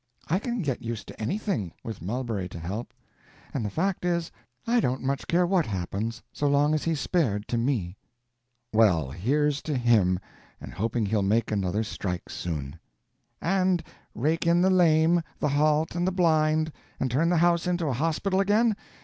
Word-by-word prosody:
I 180 +5 +1
can 235 -1 -3
get 135 -5 -2
used 115 -2 -5
to - - -10
anything, 115 - -2
with 110 -6 -6
Mulberry 105 -1 -3
to 85 - -8
help; 100 +9 -5 0.6
and 130 - -2
the 105 - -2
fact 185 - -1
is, 170 -2 0 0.3
I 240 +1 +3
don't 130 - 0
much 135 +1 -2
care 175 +1 +3
what 175 -4 +2
happens, 100 +3 -3
so 145 - 0
long 145 +2 +3
as 155 - 0
he's 165 -3 0
spared 120 - 0
to 120 - 0
me." 110 -8 -1 0.8
"Well, 90 -11 +3
here's 140 - +1
to 150 -4 -2
him, 110 -7 +3 0.4
and - - -9
hoping 115 +2 -1
he'll 105 +1 +1
make 110 +4 +1
another 100 +1 0
strike 90 -4 -4
soon." 75 -2 -5 0.6
"And 185 0 +2 0.3
rake 155 +8 0
in 170 +1 +4
the 190 - +4
lame, 170 -1 +4 0.2
the 150 - 0
halt 150 +2 +2
and 175 +1 0
the - - +2
blind, 160 -3 +2 0.3
and 130 - -1
turn 155 +7 +2
the 175 - +3
house 170 +1 +3
into 175 -2 0
a 140 - 0
hospital 165 - 0
again? 210 +3 +3
145 Hz, 175 wpm, -27 LUFS, 110-170 Hz, 0.8 s, in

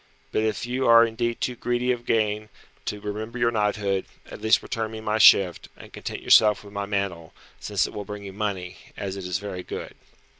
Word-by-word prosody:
But - - +1
if 110 +1 -1
you 130 +2 -1
are 115 0 +8
indeed 115 +1 -2
too 125 - -1
greedy 120 +1 0
of 120 -1 -4
gain 105 -1 0 0.4
to 105 - -3
remember 110 +3 -5
your 120 0 +2
knighthood, 105 -3 0 0.3
at - - -9
least 110 - +3
return 110 -1 -3
me 110 0 -7
my 110 0 -1
shift, 95 -5 +6
and - - -13
content - - -6
yourself 105 -1 +5
with 100 0 -13
my 100 0 -3
mantle, 100 -5 -3 0.3
since - - 0
it - - -7
will 105 - -5
bring 105 +1 -8
you 100 -1 -8
money, 95 -3 -3 0.2
as 100 -2 -4
it 95 -2 -6
is 90 0 -1
very 95 -2 -6
good." - - -7
105 Hz, 210 wpm, -25 LUFS, 100-115 Hz, 0.4 s, are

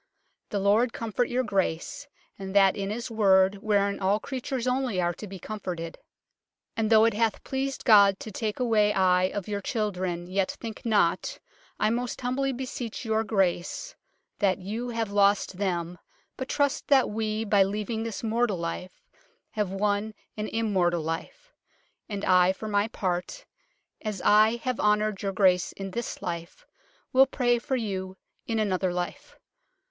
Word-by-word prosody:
" - - -48
The 205 - -2
Lord 210 +5 +3
comforte 230 +2 -1
your 250 +1 +1
Grace, 205 - -2 0.3
and 190 0 -6
that 195 -1 +6
in 195 -1 -3
his 235 +3 -4
worde, 195 -2 +4
whearin 200 -2 +1
all 195 +2 +2
creatures 260 0 -4
onlye 250 -5 0
are 175 -1 +1
to 210 - -9
be 195 0 -8
comforted. 175 -4 -6 0.8
And 220 -2 0
thoughe 220 -1 +6
it - - -8
hathe 220 0 0
pleased 270 0 -3
God 200 -4 +6
to 220 - -7
take 215 +2 -3
away 215 -4 +3
ij 185 -1 +3
of 205 -3 -4
your 205 -1 -3
children, 185 -5 -2
yet 185 +1 -1
thincke 225 0 -7
not, 205 -6 +1 0.4
I 215 - +2
most 245 +1 -2
humblye 260 +1 -1
beseach 250 -3 -5
your 220 0 +1
Grace, 195 - -1 0.4
that 195 -3 +2
you 215 +6 -4
have 230 -3 -2
loste 200 -2 +2
them, 175 -3 -2 0.4
but 260 - -5
truste 285 -1 0
that 270 -5 +4
we, 215 0 -2
by 205 -2 +4
leavinge 210 +3 -2
this 230 -1 -5
mortall 225 -2 +1
life, 170 +2 -6 0.5
have 210 -3 -1
wunne 205 +2 -1 0.2
an 215 0 -3
im 225 -2 -1
mortal 175 -3 +2
life. 165 - -6 0.6
And 200 -1 -3
I 185 0 +5
for 215 - -7
my 205 0 +1
parte, 190 - -3 0.6
as 210 -3 -4
I 215 +2 +6
have 255 -1 -1
honoured 210 -1 +2
your 195 - -1
grace 185 -2 +3
in 195 -1 -6
this 235 +4 -5
life, 170 0 -6 0.5
wyll 265 +1 +7
praye 245 -3 +1
for 265 - -1
you 190 -5 -3 0.3
in 225 - -1
another 190 -3 0
life. 175 0 -5
210 Hz, 165 wpm, -27 LUFS, 190-230 Hz, 0.8 s, wyll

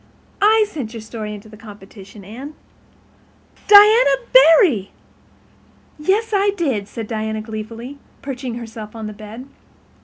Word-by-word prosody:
I 430 +1 +4
sent 260 - -7
your 225 - -7
story 220 -1 -7
into 205 +1 -13
the 215 - -14
competition, 205 -1 -14
Anne." 260 +9 -10 1.1
"Diana—Barry!" 415 - +5 1.1
"Yes, 400 +9 0
I 400 0 +2
did," 255 - -2
said 225 +1 -7
Diana 220 -1 -3
gleefully, 225 +5 -8 0.2
perching 260 -3 -5
herself 225 -2 -9
on 220 -1 -7
the 215 - -6
bed. 215 +4 -10
230 Hz, 120 wpm, -19 LUFS, 215-325 Hz, 1.1 s, Diana—Barry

